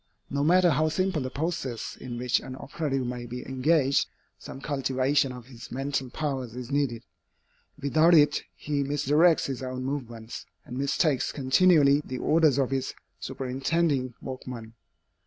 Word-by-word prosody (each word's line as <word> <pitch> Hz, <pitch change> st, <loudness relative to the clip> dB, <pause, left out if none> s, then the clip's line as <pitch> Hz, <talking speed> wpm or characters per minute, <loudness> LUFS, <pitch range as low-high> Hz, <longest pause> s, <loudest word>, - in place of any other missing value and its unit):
No 140 Hz, 0 st, 0 dB
matter 175 Hz, +2 st, +5 dB
how 155 Hz, +2 st, +2 dB
simple 185 Hz, -1 st, 0 dB
the 130 Hz, -, -3 dB
process 140 Hz, -5 st, -3 dB
in 120 Hz, -2 st, -7 dB
which 125 Hz, 0 st, +1 dB
an 130 Hz, -, -8 dB
operative 135 Hz, -2 st, -3 dB
may 120 Hz, 0 st, -4 dB
be 125 Hz, +1 st, -6 dB
engaged, 135 Hz, +1 st, +2 dB, 0.3 s
some -, -, -9 dB
cultivation 135 Hz, -1 st, +1 dB
of 125 Hz, -2 st, -9 dB
his 120 Hz, -2 st, -12 dB
mental 135 Hz, 0 st, -2 dB
powers 130 Hz, -5 st, -3 dB
is 125 Hz, +1 st, -7 dB
needed. 135 Hz, -5 st, 0 dB, 0.8 s
Without 155 Hz, +4 st, +4 dB
it 150 Hz, -1 st, +5 dB
he 145 Hz, -1 st, -2 dB
misdirects 145 Hz, +4 st, +3 dB
his 135 Hz, -2 st, -4 dB
own 130 Hz, 0 st, -4 dB
movements, 120 Hz, -5 st, -5 dB, 0.2 s
and 125 Hz, -, -8 dB
mistakes 140 Hz, +1 st, +1 dB
continually 145 Hz, +1 st, +4 dB
the 130 Hz, -, -5 dB
orders 155 Hz, -1 st, +3 dB
of 135 Hz, -2 st, +1 dB
his 135 Hz, -1 st, -2 dB, 0.2 s
superintending 135 Hz, 0 st, -1 dB
workman. 125 Hz, -4 st, -7 dB
135 Hz, 145 wpm, -27 LUFS, 125-150 Hz, 0.8 s, matter